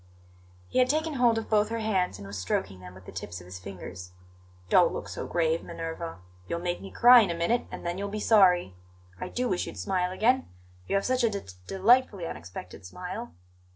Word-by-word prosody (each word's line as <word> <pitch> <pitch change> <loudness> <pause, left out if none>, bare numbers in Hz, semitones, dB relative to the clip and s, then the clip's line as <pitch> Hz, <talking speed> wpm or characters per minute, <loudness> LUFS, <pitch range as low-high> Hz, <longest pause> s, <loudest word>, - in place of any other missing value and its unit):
He - - 0
had 255 0 +4
taken 315 +2 0
hold 240 -4 +3
of 225 - -3
both 210 -1 +2
her 230 - -2
hands 195 - 0
and 100 - -9
was 100 +1 -7
stroking 95 +1 -2
them 90 0 -11
with 95 0 -14
the - - -9
tips 85 +1 -6
of 90 - -13
his 90 +1 -9
fingers. 90 -1 -9 0.5
"Don't - - +5
look - - -5
so - - -5
grave, 165 -1 +1
Minerva! 165 0 -6 0.3
You'll 170 - -2
make 175 0 -2
me 195 - -8
cry 245 +1 +8
in 200 - +1
a 170 - -1
minute, 170 +9 0
and - - -8
then 175 +2 -2
you'll 200 0 -3
be 215 +1 -4
sorry. 185 - +4 0.5
I - - -5
do 250 0 -1
wish 185 -5 -1
you'd - - -8
smile 185 -2 -1
again; 245 +7 +2 0.4
you - - 0
have 195 - +1
such 255 -1 +1
a 230 - +4
d 200 -2 -4 0.3
delightfully 205 -1 +3
unexpected 90 - -8
smile. 180 - -7
185 Hz, 215 wpm, -28 LUFS, -, 0.5 s, cry